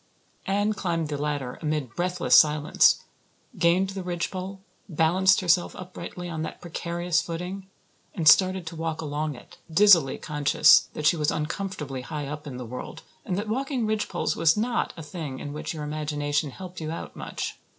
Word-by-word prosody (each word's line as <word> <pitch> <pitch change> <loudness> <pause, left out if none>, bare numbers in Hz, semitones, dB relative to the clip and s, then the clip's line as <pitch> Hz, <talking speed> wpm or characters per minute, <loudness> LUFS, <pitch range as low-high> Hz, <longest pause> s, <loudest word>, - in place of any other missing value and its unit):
Anne 205 +2 +1
climbed 170 -6 -2
the 150 - -2
ladder 145 -4 -3
amid 150 -6 -2
breathless 180 +1 0
silence, 150 -1 +5 0.6
gained 180 +3 +3
the 195 0 -5
ridgepole, 185 +2 -4 0.3
balanced 175 +3 +3
herself 175 -1 +2
uprightly 180 -1 -8
on 160 -2 -4
that 160 - -5
precarious 170 0 -1
footing, 180 +3 -6 0.5
and 165 -5 -1
started 185 +2 +6
to 165 +1 -7
walk 160 -1 -3
along 150 -1 -3
it, 125 - -15
dizzily 170 -5 +6
conscious 150 0 +4
that 150 - -4
she 165 - +5
was 150 -1 +1
uncomfortably 150 -4 -3
high 145 +3 -5
up 150 +1 -6
in 130 -3 -6
the 125 - -6
world 125 +2 -8 0.2
and 180 - -2
that 205 +2 -3
walking 260 +1 -1
ridgepoles 215 -4 -1
was 165 +3 +3
not 235 +3 0
a 165 - -7
thing 150 -3 -6
in 145 +2 -6
which 150 - -4
your 155 -2 -5
imagination 150 -1 -1
helped 185 +4 -9
you 155 - -4
out 165 - -6
much. - - -5
165 Hz, 170 wpm, -26 LUFS, 150-185 Hz, 0.6 s, started